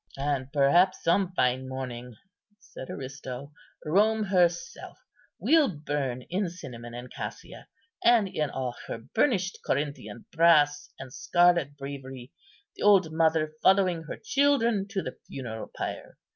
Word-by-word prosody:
"And 140 Hz, -1 st, -2 dB
perhaps 170 Hz, +7 st, +3 dB
some 180 Hz, +2 st, +2 dB
fine 130 Hz, -1 st, +1 dB
morning," 125 Hz, -2 st, -6 dB, 0.4 s
said 130 Hz, -9 st, -11 dB
Aristo, 135 Hz, 0 st, -7 dB, 0.3 s
"Rome 215 Hz, +7 st, +3 dB
herself 190 Hz, +6 st, 0 dB, 0.4 s
will 315 Hz, -3 st, +4 dB
burn 145 Hz, -6 st, -3 dB
in 185 Hz, +4 st, -2 dB
cinnamon 120 Hz, -9 st, -9 dB
and 125 Hz, +1 st, -9 dB
cassia, -, -, -8 dB, 0.4 s
and 235 Hz, -4 st, +5 dB
in 155 Hz, -5 st, -2 dB
all 130 Hz, -2 st, -3 dB
her -, -, -4 dB
burnished 195 Hz, -, 0 dB
Corinthian 140 Hz, -7 st, -3 dB
brass 155 Hz, -3 st, +4 dB
and 130 Hz, -1 st, -10 dB
scarlet 175 Hz, -5 st, +2 dB
bravery, 135 Hz, -2 st, -8 dB, 0.4 s
the -, -, -12 dB
old 195 Hz, -6 st, +5 dB
mother 160 Hz, -1 st, +2 dB
following 185 Hz, -3 st, +3 dB
her -, -, -6 dB
children 235 Hz, -7 st, +1 dB
to 200 Hz, -2 st, -3 dB
the 130 Hz, -, -7 dB
funeral 115 Hz, -5 st, -7 dB
pyre. -, -, -5 dB
150 Hz, 130 wpm, -27 LUFS, 130-190 Hz, 0.4 s, and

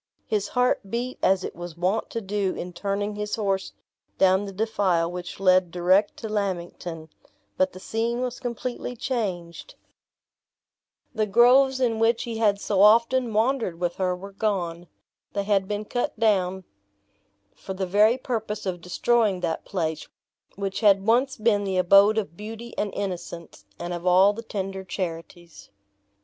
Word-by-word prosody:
His 205 Hz, -2 st, -1 dB
heart 250 Hz, -5 st, +2 dB
beat 245 Hz, +3 st, -3 dB
as 190 Hz, 0 st, +3 dB
it -, -, -5 dB
was 175 Hz, -1 st, -8 dB
wont 185 Hz, +6 st, 0 dB
to 230 Hz, -, -4 dB
do 200 Hz, -1 st, -1 dB
in 180 Hz, +1 st, -6 dB
turning 200 Hz, +3 st, -2 dB
his 210 Hz, 0 st, -3 dB
horse 195 Hz, -3 st, -1 dB, 0.5 s
down 190 Hz, +1 st, +4 dB
the 200 Hz, -, -6 dB
defile 190 Hz, -5 st, 0 dB
which 180 Hz, +1 st, -7 dB
led 185 Hz, -2 st, +4 dB
direct 185 Hz, +4 st, +2 dB
to 225 Hz, -, -6 dB
Lammington; 175 Hz, -5 st, -4 dB, 0.5 s
but 185 Hz, 0 st, +1 dB
the 185 Hz, -, -10 dB
scene 230 Hz, +4 st, -2 dB
was 250 Hz, -1 st, -3 dB
completely 245 Hz, 0 st, -4 dB
changed; 210 Hz, -, -4 dB, 1.4 s
the 215 Hz, -3 st, 0 dB
groves 255 Hz, +5 st, +5 dB
in 230 Hz, -3 st, +1 dB
which 225 Hz, +1 st, +2 dB
he 230 Hz, -2 st, -5 dB
had 205 Hz, -3 st, +3 dB
so 200 Hz, -2 st, 0 dB
often 235 Hz, +3 st, +5 dB
wandered 220 Hz, -5 st, 0 dB
with 175 Hz, -1 st, -2 dB
her 185 Hz, -1 st, 0 dB
were 195 Hz, +2 st, -10 dB
gone; 180 Hz, -4 st, -2 dB, 0.5 s
they 200 Hz, -, -1 dB
had 200 Hz, -2 st, +1 dB
been 210 Hz, +1 st, -3 dB
cut 245 Hz, -1 st, -3 dB
down 190 Hz, -4 st, +1 dB, 0.9 s
for 190 Hz, -, -8 dB
the 190 Hz, 0 st, -2 dB
very 210 Hz, +6 st, +4 dB
purpose 220 Hz, -5 st, -4 dB
of 180 Hz, -2 st, -3 dB
destroying 205 Hz, +2 st, +1 dB
that 165 Hz, -2 st, -2 dB
place, 160 Hz, -5 st, -3 dB, 0.5 s
which 195 Hz, -1 st, -3 dB
had 200 Hz, -3 st, +4 dB
once 250 Hz, +5 st, +2 dB
been 215 Hz, -2 st, +2 dB
the 190 Hz, -2 st, -1 dB
abode 200 Hz, +4 st, +6 dB
of 195 Hz, -7 st, -2 dB
beauty 225 Hz, +4 st, -8 dB
and 205 Hz, -1 st, -2 dB
innocence, 170 Hz, -, -6 dB
and 175 Hz, +1 st, -5 dB
of 175 Hz, +1 st, -4 dB
all 190 Hz, +3 st, +6 dB
the 225 Hz, -, -7 dB
tender 195 Hz, -3 st, -5 dB
charities. 170 Hz, -2 st, -7 dB
200 Hz, 160 wpm, -25 LUFS, 180-225 Hz, 1.4 s, abode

